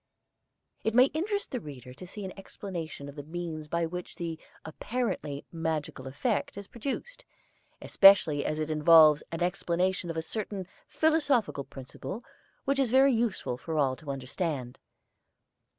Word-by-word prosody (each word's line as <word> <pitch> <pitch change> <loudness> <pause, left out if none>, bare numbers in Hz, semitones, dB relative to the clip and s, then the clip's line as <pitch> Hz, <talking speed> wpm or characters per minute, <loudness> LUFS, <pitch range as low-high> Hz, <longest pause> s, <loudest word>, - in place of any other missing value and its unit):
It 220 0 0
may 255 +2 +6
interest 405 +6 -2
the 250 - -2
reader 130 - -10
to 180 +7 -10
see 200 +2 -6
an 185 - -6
explanation 175 -7 -7
of 140 - -8
the 145 - -7
means 160 0 -5
by 170 +2 0
which 180 +2 -6
the 165 -2 -4 0.3
apparently 160 - -3
magical 160 -5 -3
effect 195 - -1
is 200 - -6
produced, 380 - -5 0.6
especially 190 -7 +6
as 155 - -1
it 155 0 -2
involves 155 -1 +7
an 165 +1 -1
explanation 180 0 0
of 165 - -3
a 160 - -1
certain 200 +1 -4 0.2
philosophical 285 - +2
principle 135 - -8 0.4
which 275 0 +1
it - - +5
is 260 - +1
very 265 +2 +5
useful 225 - -1
for 160 +2 -4
all 135 -3 +2
to 155 - -11
understand. 135 -1 -3
170 Hz, 150 wpm, -29 LUFS, 150-220 Hz, 0.6 s, involves